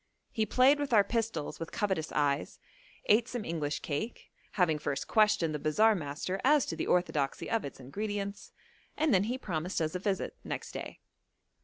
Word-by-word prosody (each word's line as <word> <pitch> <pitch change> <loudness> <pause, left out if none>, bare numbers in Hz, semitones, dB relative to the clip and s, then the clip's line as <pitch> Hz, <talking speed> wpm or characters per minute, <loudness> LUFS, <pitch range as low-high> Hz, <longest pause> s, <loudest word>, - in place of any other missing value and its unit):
He 220 -3 0
played 265 +6 +5
with 285 -4 -2
our 210 -2 +7
pistols 220 -7 -2
with 165 - -6
covetous 190 -6 -1
eyes, 145 -1 0 0.5
ate 225 +3 +4
some 245 -4 -4
English 150 -3 -2
cake, 160 +11 -4 0.2
having 170 -6 +2
first 145 -2 -3
questioned 210 -7 +3
the 150 - -2
bazaar 215 +10 +4
master 175 +2 -3
as 290 0 +5
to 165 - -4
the 160 - -3
orthodoxy 155 -6 0
of 225 -1 0
its 140 - -7
ingredients, 200 +8 -4 0.5
and 310 -4 +2
then 195 +1 +4
he 245 +4 -2
promised 180 - -3
us 155 -1 -1
a 180 - -2
visit 195 0 -2
next - - -5
day. - - -7
195 Hz, 175 wpm, -31 LUFS, 155-220 Hz, 0.5 s, our